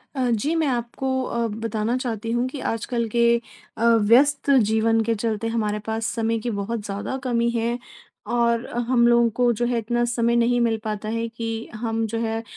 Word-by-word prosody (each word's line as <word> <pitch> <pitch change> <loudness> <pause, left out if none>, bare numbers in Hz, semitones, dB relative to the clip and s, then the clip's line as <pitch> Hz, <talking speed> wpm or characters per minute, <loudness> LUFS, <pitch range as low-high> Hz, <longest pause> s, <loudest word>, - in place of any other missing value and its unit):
अ, 255 -2 0
जी 235 +8 0
मैं 320 -2 +1
आपको 245 +1 -2 0.2
अ, 235 -2 -1
बताना 225 +1 -2
चाहती 230 -3 -3
हूँ 240 +2 +1
कि 275 +1 -7
आजकल 230 +1 -2
के 235 +1 +2 0.5
अ, 230 - 0
व्यस्त 235 +6 +4 0.2
जीवन 225 +1 +2
के 230 - +2
चलते 220 0 -2
हमारे 215 -2 -1
पास 225 0 -2
समय 225 0 0
की 240 - -3
बहुत 215 +1 -3
ज़्यादा 205 +6 -4
कमी 235 -2 +1
है, 235 +1 -1 0.5
और 235 0 +1 0.2
हम 240 -2 +4
लोगों 235 0 +4
को 245 -1 +3
जो 240 - +2
है 240 0 0
इतना 240 +2 0
समय 235 0 +1
नहीं 240 +1 +3
मिल 230 -1 +2
पाता 215 -1 -4
है 230 +1 -2
कि 230 0 -6 0.3
हम 225 0 -1
जो 225 +1 -3
है 225 0 -2
230 Hz, 190 wpm, -23 LUFS, 225-240 Hz, 0.5 s, व्यस्त